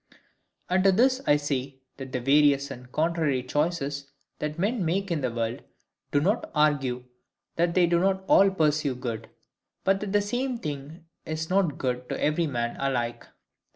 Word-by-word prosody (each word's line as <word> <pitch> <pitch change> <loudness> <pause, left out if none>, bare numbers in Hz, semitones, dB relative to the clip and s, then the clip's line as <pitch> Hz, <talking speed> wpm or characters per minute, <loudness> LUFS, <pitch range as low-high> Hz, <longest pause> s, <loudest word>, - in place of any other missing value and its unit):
And 185 +1 +2
to 195 - +6
this 255 +6 +3
I 145 - +6
say, 140 -2 -2 0.2
that 135 -1 -8
the 130 - -1
various 140 +1 +3
and 125 -1 -10
contrary 155 -4 0
choices 145 0 -1 0.3
that 150 +1 -3
men 205 +4 0
make 190 +3 -1
in 160 -3 0
the 130 - 0
world 115 0 -3 0.5
do 145 - +3
not 195 +10 0
argue 140 -5 +2 0.5
that 170 0 +1
they 180 -1 +5
do 170 0 +2
not 190 +1 +1
all 195 0 +6
pursue 150 -6 +1
good; 120 -3 -5 0.5
but 195 0 +2
that 205 -1 -4
the 205 0 +3
same 245 +4 -2
thing 150 0 -7 0.2
is 160 +2 -4
not 185 -7 +2
good 125 -1 -3
to - - -3
every 155 +2 +1
man 120 -4 -2
alike. 120 -4 -2
150 Hz, 170 wpm, -27 LUFS, 135-185 Hz, 0.5 s, to